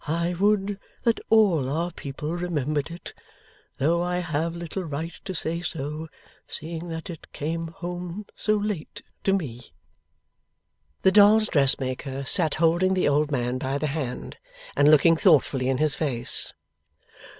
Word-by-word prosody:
I 170 +3 0
would 200 +1 +1 0.2
that 230 -1 +2
all 190 -12 +4
our 165 +5 -1
people 150 +1 -6
remembered 155 -4 -2
it! 170 +1 -9 0.6
Though 165 +5 +1
I 180 0 -1
have 165 -1 -2
little 170 +2 -5
right 160 +1 -5
to 190 - -5
say 165 +2 -3
so, 155 -1 -5 0.4
seeing 165 +2 -6
that 165 +3 -6
it 165 - -12
came 165 +3 -3
home 175 +3 -6
so 215 0 +1
late 205 -6 -4 0.2
to 195 - +3
me.' 125 - -4 1.3
The 190 - +5
dolls' 210 +2 +6
dressmaker 135 -1 0
sat 160 +1 +6
holding 175 +3 +2
the 185 - +1
old 145 +1 +2
man 125 -2 -1
by 135 +2 -2
the 155 - -2
hand, 135 -6 -5 0.4
and 145 - +5
looking 160 +2 +5
thoughtfully 140 -7 +3
in 135 - +1
his 150 0 +3
face. 125 -6 0
165 Hz, 145 wpm, -25 LUFS, 145-180 Hz, 1.3 s, dolls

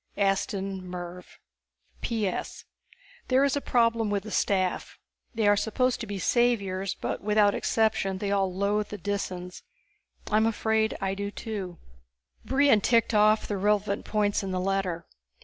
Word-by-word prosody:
_ - - -8
Aston 195 -1 0
Mervv 180 0 -8 0.6
_P.S. 215 -6 -3 0.6
There 260 +1 +4
is 280 -1 +2
a 285 - -1
problem 230 -3 +2
with 200 -1 -1
the 215 - -8
staff. 185 -3 0 0.4
They 220 -2 +2
are 205 - +6
supposed 250 +4 0
to 230 - -5
be 205 -1 -4
saviors, 195 -3 +1
but - - -4
without 210 0 +3
exception 215 -4 0
they 200 +1 -2
all 195 -2 +1
loathe 200 +3 0
the 210 - -7
Disans. 185 -2 -4 0.7
I'm 220 +1 +4
afraid 220 0 0
I 195 0 0
do 200 +1 -3
too._ 200 -5 -6 0.7
Brion 270 -5 +4
ticked 230 +1 +2
off 215 +1 +4
the 205 - -2
relevant 205 +1 +1
points 205 -1 0
in 195 - -4
the 185 -1 -1
letter. 185 -3 -1
205 Hz, 150 wpm, -27 LUFS, 190-220 Hz, 0.7 s, are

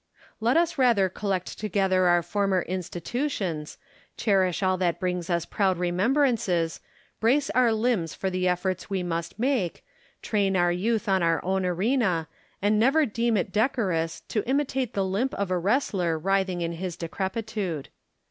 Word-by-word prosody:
Let 235 +6 +2
us 335 -3 +1
rather 230 -7 +4
collect 190 -1 -3
together 190 -3 +2
our 175 -1 +4
former 195 -1 0
institutions, 180 - -3 0.4
cherish 190 -3 +1
all 185 0 +3
that 175 -2 0
brings 180 -2 -2
us 170 -1 0
proud 190 -3 +1
remembrances, 180 - +1 0.4
brace 265 +6 +2
our 250 -2 +4
limbs 220 -7 0
for 190 - -2
the 185 0 0
efforts 180 +1 -1
we 190 -2 -1
must 170 +1 -3
make, 240 -7 -1 0.4
train 200 -3 +1
our 175 0 +3
youth 220 +5 0
on 190 -2 +2
our 165 -1 +2
own 190 0 0
arena, 185 -3 +1 0.4
and 210 +1 +3
never 275 +7 +4
deem 230 -1 0
it 190 0 -1
decorous 190 -8 0
to 215 - -2
imitate 265 -3 0
the 195 -1 +1
limp 205 +8 -1
of 200 -2 -2
a 180 - +1
wrestler 190 - +1
writhing 190 +1 0
in 165 0 -1
his 175 0 -5
decrepitude. 190 - -3
190 Hz, 155 wpm, -26 LUFS, 175-225 Hz, 0.4 s, rather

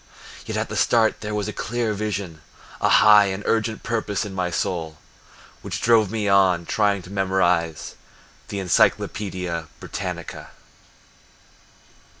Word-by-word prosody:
Yet - - -3
at - - -1
the - - -6
start 115 -2 +2
there 105 0 -4
was 105 -1 -2
a 105 - -4
clear 115 +1 -2
vision, 100 -6 -4 0.4
A - - +3
high 105 -1 +7
and 95 +1 -3
urgent 110 0 -1
purpose 110 -2 -2
in 100 - -7
my 90 -2 -1
soul 80 -3 -3 0.6
Which - - -5
drove 110 -3 +4
me 105 -1 -2
on 95 -3 +3
trying 100 0 +1
to 90 - -12
memorize 90 -4 0 0.5
The 100 - -5
Encyclopedia 90 -2 0
Britannica! - - -6
100 Hz, 135 wpm, -23 LUFS, 90-105 Hz, 0.6 s, high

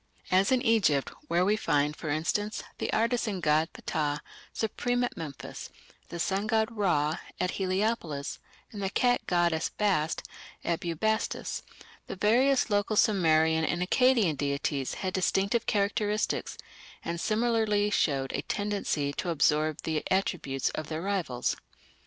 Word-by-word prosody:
As 190 +4 +4
in 255 -1 +3
Egypt, 205 - +3 0.2
where 180 -5 +2
we 210 +2 +3
find, 150 -7 +1
for 155 - -6
instance, 190 +8 -1 0.2
the - - -2
artisan 230 -3 0
god 155 0 +2
Ptah 150 -3 -2 0.3
supreme 245 +3 -1
at 245 - -2
Memphis, 150 -4 -7 0.4
the 170 - -6
sun 195 +4 -1
god 220 0 +1
Ra 165 -8 +1 0.2
at 180 0 0
Heliopolis, 185 -6 -1 0.3
and 205 - -7
the 195 - 0
cat 245 +4 +1
goddess 170 -2 +1
Bast 185 -7 0 0.4
at 170 -1 0
Bubastis, 200 +5 -1 0.5
the - - -5
various 245 +5 +3
local 205 +1 +1
Sumerian 160 -6 +4
and 175 +2 0
Akkadian 230 - +3
deities 140 -1 -1
had 185 -1 -3
distinctive 195 +4 +1
characteristics, 210 +1 0 0.5
and 170 0 -3
similarly 220 -2 +1
showed 135 -8 +1
a - - -1
tendency 200 -9 -1
to 175 - -3
absorb 155 -1 +2
the 160 -1 -1
attributes 170 -8 0
of 155 - -5
their 160 +1 -4
rivals. 185 -11 -1
185 Hz, 135 wpm, -29 LUFS, 155-215 Hz, 0.5 s, As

